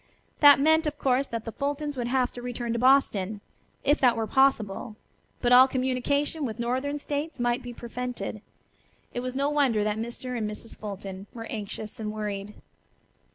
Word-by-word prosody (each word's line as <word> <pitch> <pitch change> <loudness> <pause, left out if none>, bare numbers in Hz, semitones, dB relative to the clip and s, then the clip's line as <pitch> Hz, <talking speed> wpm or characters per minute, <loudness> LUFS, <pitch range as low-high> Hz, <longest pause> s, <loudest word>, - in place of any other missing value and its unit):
That 290 -1 +9
meant 315 +2 +4
of 295 -1 -3
course 270 -1 +1
that 230 -1 -5
the 225 - -4
Fultons 290 +3 -3
would 245 -2 -2
have 255 0 +1
to 245 - -7
return 240 -1 -3
to 235 - -1
Boston, 220 -6 +3 0.4
if 290 +2 +3
that 245 -3 +4
were 225 - 0
possible, 220 -4 +1 0.5
but 245 - +2
all 255 +1 +9
communication 265 +4 0
with 225 -5 -3
northern 260 +5 -1
states 290 0 -4
might 240 +1 +1
be 245 - -7
prevented. 240 -3 -5 0.7
It - - -2
was 255 +1 -4
no 280 +2 +1
wonder 265 -8 +2
that 210 +1 -1
Mr. 240 +2 -5
and 215 -3 -1
Mrs. 210 +2 -8
Fulton 195 -1 -7
were 225 -1 -6
anxious 215 +1 -6
and 210 -1 -3
worried. 210 -1 -4
245 Hz, 175 wpm, -27 LUFS, 220-275 Hz, 0.7 s, That